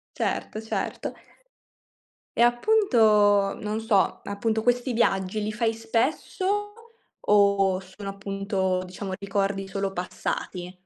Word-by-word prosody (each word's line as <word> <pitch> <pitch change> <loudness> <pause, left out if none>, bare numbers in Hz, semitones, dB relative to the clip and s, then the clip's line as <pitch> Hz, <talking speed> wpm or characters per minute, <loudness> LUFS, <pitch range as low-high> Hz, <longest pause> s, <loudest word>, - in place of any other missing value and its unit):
Certo, 215 - -2
certo. 220 - -4 1.2
E 235 - +4
appunto, 225 - +4
non 215 +1 -2
so, 210 -3 +2
appunto 220 +2 -1
questi 245 +1 +1
viaggi 200 -2 +1
li 215 +1 -2
fai 225 +1 0
spesso 320 - -1 0.5
o 200 -2 +3
sono 190 +2 -9
appunto, 195 -2 -2
diciamo, 185 +1 -6
ricordi 195 0 -1
solo 195 0 -3
passati? 180 0 -4
205 Hz, 105 wpm, -26 LUFS, 195-225 Hz, 1.2 s, E